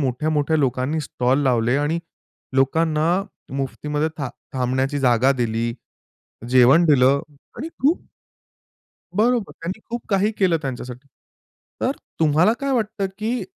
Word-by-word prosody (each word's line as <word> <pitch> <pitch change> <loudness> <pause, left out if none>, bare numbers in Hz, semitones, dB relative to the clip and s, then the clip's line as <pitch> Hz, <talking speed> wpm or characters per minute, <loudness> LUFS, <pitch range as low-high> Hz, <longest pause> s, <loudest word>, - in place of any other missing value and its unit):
मोठ्या-मोठ्या 150 +3 0
लोकांनी 135 +2 0
स्टॉल 130 -2 0
लावले 125 -1 +2
आणि 150 +4 0 0.6
लोकांना 155 +3 +2 0.5
मुफ्तीमध्ये 150 +3 -2
था 135 - -2 0.3
थांबण्याची 130 +2 0
जागा 130 +1 +3
दिली, 115 -2 -1 0.8
जेवण 130 +6 +6
दिलं 140 -2 +4 0.4
आणि 295 - -4
खूप 300 +6 +3 1.2
बरोबर. 230 0 +2
त्यांनी 185 +6 -5
खूप 240 +1 -4
काही 200 +1 +2
केलं 180 -4 +3
त्यांच्यासाठी. 130 0 -6 0.7
तर - - +1 0.3
तुम्हाला 160 +6 +4
काय 275 0 -1
वाटतं, 215 -4 -1
की 230 +3 -1
145 Hz, 115 wpm, -22 LUFS, 130-180 Hz, 1.2 s, जेवण